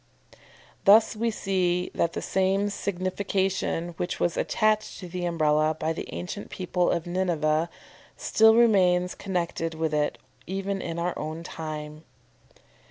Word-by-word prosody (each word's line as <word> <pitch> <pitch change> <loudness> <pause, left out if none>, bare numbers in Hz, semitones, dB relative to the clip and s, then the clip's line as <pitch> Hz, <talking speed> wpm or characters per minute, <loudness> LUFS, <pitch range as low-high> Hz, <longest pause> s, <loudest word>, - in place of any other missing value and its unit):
Thus 215 +3 +6
we 230 +2 0
see 185 -4 0
that 170 - 0
the - - -4
same 195 +2 +1
signification 190 -2 -1
which 175 - -3
was 175 - +1
attached 215 -1 +1
to 180 - -8
the 175 0 -4
Umbrella 155 -2 +2
by 160 - 0
the - - -6
ancient 190 +3 -6
people 180 -1 0
of 170 -2 0
Nineveh, 170 -3 0 0.5
still 220 0 +5
remains 180 -6 +4
connected 170 -3 -3
with 160 -1 -1
it 150 0 0 0.3
even 195 +1 -2
in 165 0 -4
our 175 +1 -1
own 155 +2 -5
time. 155 -2 -6
180 Hz, 135 wpm, -26 LUFS, 165-195 Hz, 0.5 s, Thus